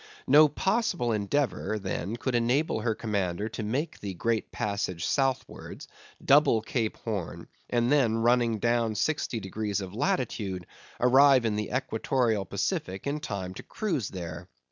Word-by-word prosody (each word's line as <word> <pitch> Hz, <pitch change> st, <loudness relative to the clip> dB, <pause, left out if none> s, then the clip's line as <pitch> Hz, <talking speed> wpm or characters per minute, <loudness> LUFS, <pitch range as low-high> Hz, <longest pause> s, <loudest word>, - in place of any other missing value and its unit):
No 150 Hz, +3 st, +7 dB
possible 190 Hz, -, 0 dB
endeavor 110 Hz, -1 st, 0 dB
then 95 Hz, +1 st, -3 dB
could 125 Hz, +2 st, -3 dB
enable 120 Hz, +3 st, +1 dB
her 110 Hz, 0 st, 0 dB
commander 100 Hz, -2 st, -2 dB
to 115 Hz, -, -6 dB
make 135 Hz, +10 st, -2 dB
the 100 Hz, -2 st, -5 dB
great 115 Hz, +4 st, -1 dB
passage 100 Hz, -5 st, -2 dB
southwards, 135 Hz, -2 st, -2 dB, 0.4 s
double 135 Hz, -6 st, +5 dB
Cape 110 Hz, -1 st, -2 dB
Horn, 105 Hz, -7 st, -5 dB, 0.2 s
and 120 Hz, +1 st, +1 dB
then 125 Hz, -7 st, +3 dB
running 120 Hz, -1 st, +3 dB
down 115 Hz, 0 st, +1 dB
sixty 145 Hz, -3 st, -1 dB
degrees 105 Hz, 0 st, -3 dB
of 95 Hz, -1 st, -6 dB
latitude 105 Hz, -7 st, -1 dB, 0.3 s
arrive 130 Hz, 0 st, +6 dB
in 110 Hz, -2 st, +1 dB
the 105 Hz, 0 st, -2 dB
equatorial 120 Hz, -4 st, 0 dB
Pacific 95 Hz, +1 st, -3 dB
in 145 Hz, +2 st, -1 dB
time 100 Hz, -10 st, -5 dB
to -, -, -8 dB
cruise 165 Hz, -, -2 dB
there. 85 Hz, -4 st, -7 dB
115 Hz, 145 wpm, -28 LUFS, 100-130 Hz, 0.4 s, No